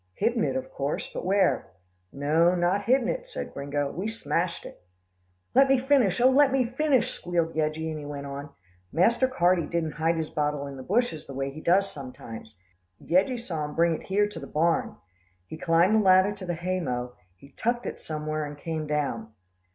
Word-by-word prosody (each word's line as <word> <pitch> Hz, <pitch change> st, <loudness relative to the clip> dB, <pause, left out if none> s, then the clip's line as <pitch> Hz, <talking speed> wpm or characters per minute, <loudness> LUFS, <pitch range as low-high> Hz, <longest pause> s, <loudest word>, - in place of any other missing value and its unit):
"Hidden 230 Hz, +1 st, +1 dB
it -, -, 0 dB
of 265 Hz, 0 st, -4 dB
course, 140 Hz, +2 st, -3 dB
but -, -, -4 dB
where?" 185 Hz, -9 st, +2 dB, 0.4 s
"No, 160 Hz, +5 st, +2 dB
not 180 Hz, +3 st, +1 dB
hidden 250 Hz, 0 st, +3 dB
it," -, -, -3 dB
said -, -, -6 dB
Gringo, 140 Hz, 0 st, -2 dB
"we've 195 Hz, +5 st, -3 dB
smashed 170 Hz, -4 st, -2 dB
it." -, -, -11 dB, 0.7 s
"Let 270 Hz, +1 st, +5 dB
me 270 Hz, -, +5 dB
finish, 255 Hz, -7 st, +2 dB
oh! 255 Hz, +2 st, +6 dB
let 275 Hz, 0 st, +5 dB
me 265 Hz, -2 st, +2 dB
finish," 255 Hz, -1 st, +1 dB
squealed 170 Hz, -2 st, -1 dB
Yeggie, 155 Hz, +1 st, -1 dB
and 155 Hz, -, -5 dB
he 145 Hz, -, -8 dB
went 140 Hz, -1 st, -6 dB
on. 140 Hz, +1 st, -6 dB, 0.4 s
"Master 235 Hz, +9 st, +3 dB
Carty 180 Hz, -9 st, +2 dB
didn't 165 Hz, -2 st, -1 dB
hide 165 Hz, +2 st, 0 dB
his 160 Hz, -1 st, -3 dB
bottle 150 Hz, -1 st, -1 dB
in 140 Hz, -1 st, -7 dB
the 130 Hz, -, -8 dB
bushes 205 Hz, -, -1 dB
the 135 Hz, -, -8 dB
way 135 Hz, 0 st, -2 dB
he 155 Hz, +3 st, -9 dB
does 195 Hz, +4 st, +3 dB
sometimes. 115 Hz, -5 st, -9 dB, 0.4 s
Yeggie 195 Hz, +8 st, +1 dB
saw 170 Hz, -10 st, -4 dB
him 150 Hz, -, -7 dB
bring 170 Hz, 0 st, +3 dB
it -, -, -6 dB
here 205 Hz, +2 st, +2 dB
to 210 Hz, -, -8 dB
the -, -, -8 dB
barn. 165 Hz, +2 st, +1 dB, 0.5 s
He 160 Hz, -, -8 dB
climbed 165 Hz, +4 st, +3 dB
the 220 Hz, -, +5 dB
ladder 185 Hz, +1 st, +5 dB
to 200 Hz, -3 st, -8 dB
the 175 Hz, -, -1 dB
hay 185 Hz, +3 st, -2 dB
mow, 125 Hz, -6 st, -3 dB, 0.2 s
he 140 Hz, +9 st, -17 dB
tucked 240 Hz, -, -1 dB
it -, -, -5 dB
somewhere 155 Hz, 0 st, -3 dB
and 145 Hz, 0 st, -7 dB
came 155 Hz, 0 st, -4 dB
down." 140 Hz, -7 st, -2 dB
170 Hz, 200 wpm, -27 LUFS, 150-215 Hz, 0.7 s, oh